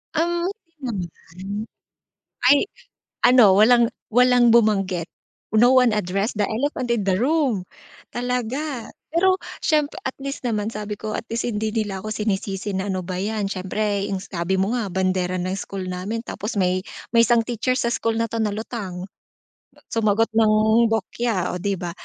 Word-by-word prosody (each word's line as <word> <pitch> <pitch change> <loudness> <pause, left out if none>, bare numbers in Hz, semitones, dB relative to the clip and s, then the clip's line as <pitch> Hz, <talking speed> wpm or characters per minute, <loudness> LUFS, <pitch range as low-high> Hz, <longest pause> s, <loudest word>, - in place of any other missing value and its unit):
Um, 345 +2 +1 0.3
hindi 220 -10 -3
naman, 200 +5 -7 0.8
ay 285 - +7 0.7
ano 245 -6 +7
walang 235 +3 +6 0.3
walang 245 -1 +5
bumanggit, 195 -7 +2 0.4
No 240 +4 +5
one 250 -2 +6
addressed 205 +1 -1
the 205 - +2
elephant 245 +1 -1
in 225 - -1
the 190 -1 +1
room. 260 - +1 0.5
Talaga! 250 +2 -2 0.2
Pero 370 +4 +3 0.2
siyempre 300 -2 +1
at 260 - -2
least 275 -2 -4
naman 215 -2 -1
sabi 210 -1 -5
ko 215 +1 -6
at - - -7
least 230 0 -2
hindi 220 -1 -2
nila 205 -3 -1
ako 215 +2 -5
sinisisi 200 -1 -2
na 190 0 -2
ano 185 -2 -2
ba 180 +1 -4
'yan, 205 0 -2
siyempre 200 +1 -1
yung 195 -2 -3
sabi 175 0 -2
mo 190 +2 +1
nga 225 - -2
bandera 185 -1 0
ng 185 +2 -2
school 190 -2 -5
namin 195 +6 -3
tapos 215 -1 -5
may 185 -1 0 0.2
may 230 0 +5
isang 235 0 +4
teacher 245 +2 -1
sa 235 -2 0
school 230 -1 0
na 230 0 -1
'to 230 - -3
na 215 -2 0
lutang, 200 -4 -6 0.8
sumagot 225 0 +2
ng 220 -1 +4 0.4
bokya, 220 -2 -1
oh, 180 - -4
'di 200 +2 -1
ba. 175 -2 -5
215 Hz, 165 wpm, -22 LUFS, 195-240 Hz, 0.8 s, ay